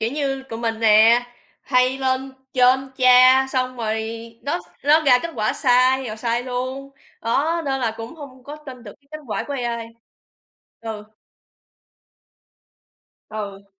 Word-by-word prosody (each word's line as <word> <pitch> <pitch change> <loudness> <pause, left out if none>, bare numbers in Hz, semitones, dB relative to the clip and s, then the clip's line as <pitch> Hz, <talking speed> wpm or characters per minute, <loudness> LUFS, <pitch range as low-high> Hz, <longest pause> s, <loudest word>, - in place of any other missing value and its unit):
kiểu 225 +2 -1
như, 275 -2 -2
tụi 230 -4 -8
mình 225 -1 -3
nè, 225 +2 +5 0.4
hay 255 0 +1
lên 265 0 -1 0.2
trên 260 +1 +3
tra 255 +1 +6
xong 255 -1 -2
rồi 220 -1 -2 0.4
nó 285 - -1 0.3
nó 300 +2 +5
ra 260 -4 +5
kết 335 - -4
quả 215 -1 0
sai 255 +1 +2
rồi 215 -1 -6
sai 235 +1 -1
luôn, 255 +2 -5 0.3
đó, 315 +8 0
nên 270 -1 -2
là 225 -2 -1
cũng 225 +4 -8
hông 270 -5 -12
có 290 +2 -8
tin 265 -5 -11
được 205 -3 -10
cái 280 - -35
kết 310 0 -8
quả 220 - -3
của 285 - -5
AI. 235 -3 -3 0.9
Ừ. 220 -2 -7 2.2
Ừ. 200 -2 -7
255 Hz, 150 wpm, -21 LUFS, 230-270 Hz, 2.2 s, tra